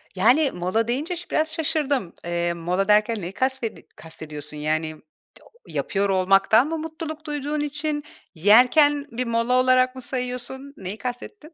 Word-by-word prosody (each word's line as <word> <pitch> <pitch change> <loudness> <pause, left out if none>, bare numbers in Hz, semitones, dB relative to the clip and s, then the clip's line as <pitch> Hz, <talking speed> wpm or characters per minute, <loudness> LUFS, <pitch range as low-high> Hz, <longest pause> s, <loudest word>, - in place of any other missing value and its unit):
Yani, 255 +10 +4
mola 185 +6 -1
deyince 295 +9 -2
şı 345 - -6
biraz 315 0 0
şaşırdım. 290 - -1
Eee, 170 0 -1
mola 180 +4 -1
derken 210 +1 +3
neyi 175 +2 -5
kasvedi 260 -2 -2
kastediyorsun? 150 -2 -9
Yani, 155 +1 -1
t 155 - -17 0.7
yapıyor 200 -1 0
olmaktan 195 +6 +4
mı 325 - -2
mutluluk 315 -1 -6
duyduğun 295 0 -3
için 295 0 -2 0.3
yerken 255 - +5
bir 245 +2 -3
mola 230 +2 +1
olarak 255 0 +4
mı 260 - -7
sayıyorsun? 255 +2 -5
Neyi 190 +2 -6
kastettin? 300 - -7
250 Hz, 145 wpm, -23 LUFS, 195-295 Hz, 0.7 s, yerken